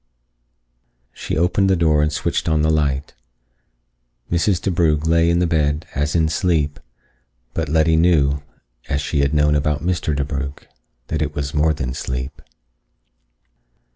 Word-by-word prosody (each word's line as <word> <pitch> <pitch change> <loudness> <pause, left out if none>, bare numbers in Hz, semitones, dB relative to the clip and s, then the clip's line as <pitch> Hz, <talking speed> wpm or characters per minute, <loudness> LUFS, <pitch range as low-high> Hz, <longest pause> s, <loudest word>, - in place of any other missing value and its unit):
She - - -4
opened 90 +3 +2
the 95 - +4
door 80 -3 +3
and 75 0 +1
switched 75 - -1
on 80 -1 +2
the 80 - +3
light. 75 -3 0 1.2
Mrs. 85 +2 +2
DeBrugh 80 -5 +1
lay 85 +1 +3
in 85 - +2
the 90 - +2
bed 75 -2 0
as 75 +3 -1
in 80 -2 +3
sleep, 80 -3 0 0.7
but 80 -2 -2
Letty 80 +1 +3
knew, 75 -5 +3 0.5
as 70 - 0
she 75 0 -2
had 70 0 +2
known 75 0 +3
about 75 0 0
Mr. 85 -4 0
DeBrugh, 70 0 -3 0.5
that 80 -1 -1
it 75 -1 -2
was 70 -2 -3
more 75 +1 +2
than 65 -4 -3
sleep. 65 +2 -5
75 Hz, 145 wpm, -20 LUFS, 75-80 Hz, 1.2 s, the